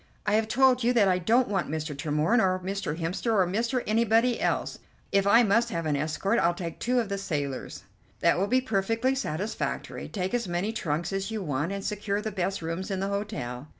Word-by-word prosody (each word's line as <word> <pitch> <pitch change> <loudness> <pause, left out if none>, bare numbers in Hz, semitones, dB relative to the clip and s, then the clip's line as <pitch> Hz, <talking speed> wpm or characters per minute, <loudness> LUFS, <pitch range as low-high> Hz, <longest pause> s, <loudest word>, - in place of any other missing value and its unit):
"I 210 - +1
have 220 +1 +2
told 255 +1 +4
you 245 +1 +3
that 220 -5 +4
I 185 -1 +2
don't 235 +8 +3
want 195 -3 -1
Mr. 155 -1 -3
Tremorne, 150 - +1
or 185 -1 +2
Mr. 185 -4 -3
Hemster, 180 +7 -1
or 190 -3 +4
Mr. 230 +7 -1
Anybody 230 +2 +2
else. - - -1 0.3
If 200 0 +3
I 230 +4 +7
must 230 +3 +3
have 165 -4 -3
an 150 -2 +1
escort 155 +6 0
I'll 170 +3 +2
take 170 -2 -6
two 250 +1 +1
of 230 - -1
the 200 0 -3
sailors." 145 -8 -4 0.4
"That - - +3
will 195 - +1
be 255 +4 +3
perfectly 225 +2 0
satisfactory. 205 - -3
Take 190 0 -3
as 240 -4 0
many 180 +5 -1
trunks 170 -3 -2
as 195 +1 -2
you 220 -3 -3
want, 150 +2 -1
and 200 0 -4
secure 205 -1 -1
the 215 0 -4
best 190 -2 -2
rooms 165 +4 -3
in 195 -2 -2
the 195 +1 -1
hotel." 195 - -4
195 Hz, 215 wpm, -27 LUFS, 170-225 Hz, 0.4 s, I